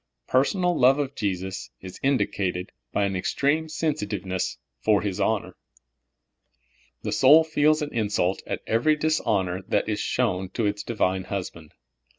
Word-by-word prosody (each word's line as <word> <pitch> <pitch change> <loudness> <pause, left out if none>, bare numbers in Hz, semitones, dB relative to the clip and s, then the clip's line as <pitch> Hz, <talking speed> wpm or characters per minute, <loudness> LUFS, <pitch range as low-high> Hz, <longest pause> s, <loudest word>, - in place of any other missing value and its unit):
Personal 175 +7 +2
love 130 0 +5
of 140 -2 -2
Jesus 95 - -3
is 95 -1 -10
indicated 95 -9 0 0.2
b}^ 100 - +3
an 95 -1 -2
ex 90 - -2
treme 155 +3 +1
sensitiveness 105 - -2 0.2
for 105 - +2
His 100 -3 -3
honor. 110 -3 0 1.5
The - - -2
soul 150 +5 +7
feels 155 0 +2
an 145 - -6
insult 100 -4 0
at - - -4
ever\' 120 +8 +2
dishonor 105 - 0
that - - +1
is 105 -1 -1
shown 95 -7 0
to 115 - 0
its 105 0 -1
Divine 95 -5 -1
Husband. 85 -5 -6
105 Hz, 145 wpm, -25 LUFS, 95-145 Hz, 1.5 s, soul